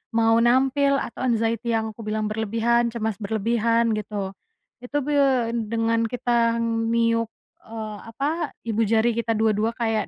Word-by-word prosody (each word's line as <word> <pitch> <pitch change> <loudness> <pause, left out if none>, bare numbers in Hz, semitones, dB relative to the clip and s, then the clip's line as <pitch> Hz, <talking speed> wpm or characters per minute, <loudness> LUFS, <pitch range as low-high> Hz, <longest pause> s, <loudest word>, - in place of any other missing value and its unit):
mau 225 0 +4
nampil, 270 +4 +3
atau 270 - -4
anxiety 230 0 0
yang 220 0 -1
aku 215 - -22
bilang 215 0 -1
berlebihan, 230 +2 +1
cemas 220 -3 -3
berlebihan 230 +2 +1
gitu. 205 -2 -4 0.5
Itu, 275 +4 -3
be 295 - -3 0.6
dengan 230 +1 +1
kita 235 -1 +1
meniup, 230 0 +1 0.4
eee, 220 -1 -6
apa, 290 +8 -2
ibu 225 -1 -2
jari 225 +2 +3
kita 230 0 -1
dua-dua 220 +1 +1
kayak 225 -3 -1
230 Hz, 135 wpm, -24 LUFS, 220-235 Hz, 0.6 s, mau